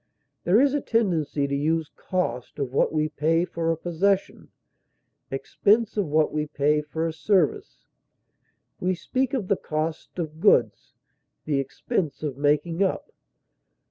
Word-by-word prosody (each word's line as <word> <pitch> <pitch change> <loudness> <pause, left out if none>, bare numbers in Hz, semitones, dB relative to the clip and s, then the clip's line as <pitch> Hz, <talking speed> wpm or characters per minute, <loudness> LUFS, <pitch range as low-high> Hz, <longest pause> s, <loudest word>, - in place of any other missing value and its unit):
There 185 +6 +5
is 275 +1 +4
a 290 - 0
tendency 165 - 0
to 140 - -3
use 160 +2 0
cost 125 -10 -3
of 135 -2 -3
what - - +2
we 155 0 +1
pay 160 +3 +1
for 165 -2 -1
a 165 - -1
possession, 185 +4 -1 0.8
expense 200 +11 +1
of 205 -5 0
what 155 +1 +2
we 150 0 -1
pay 150 0 +1
for 160 +2 -3
a 165 - -2
service; 175 0 0 0.9
we 185 +1 0
speak 260 +8 -1
of 215 -8 -2
the 200 - +2
cost 155 +3 -4
of 160 -2 -4
goods, - - +2 0.5
the 145 -3 +1
expense 150 - -3
of 145 -4 -2
making 150 +5 +1
up. 195 - -1
160 Hz, 145 wpm, -25 LUFS, 150-185 Hz, 0.9 s, There